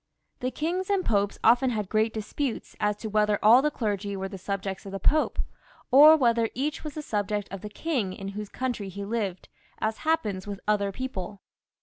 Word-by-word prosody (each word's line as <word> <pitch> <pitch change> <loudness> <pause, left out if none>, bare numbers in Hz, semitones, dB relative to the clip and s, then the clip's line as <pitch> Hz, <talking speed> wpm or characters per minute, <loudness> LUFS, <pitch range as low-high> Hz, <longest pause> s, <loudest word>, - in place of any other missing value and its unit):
The 255 -1 -1
kings 345 +8 -2
and 395 -2 +1
popes 205 -1 +1
had - - +4
often 245 +2 +2
had 215 -4 -2
great 220 +3 +1
disputes 225 +4 -4
as 210 -1 +1
to 220 - -6
whether 210 -1 +2
all 235 +4 +8
the 300 - +2
clergy 205 -6 -2
wer6 195 0 -4
the 195 - -6
subjects 195 0 -4
of - - -7
the 195 - -4
Pope, 305 +10 +2 0.5
or 300 +4 +9
whether 235 -4 +2
each 290 +4 -2
was 300 -2 -6
the 305 - -5
subject 205 -3 -2
' - - -35
of 195 - -5
the 210 - -6
king 240 - -2
in 195 +1 -6
whose 205 +1 -6
country 245 -6 -3
he 200 +2 -6
lived, 200 -4 -3 0.3
as 220 0 -1
happens 215 -13 -1
with 200 -1 -5
( - - -43
other 205 -1 +2
people. 200 -4 -6
215 Hz, 215 wpm, -27 LUFS, 200-260 Hz, 0.5 s, or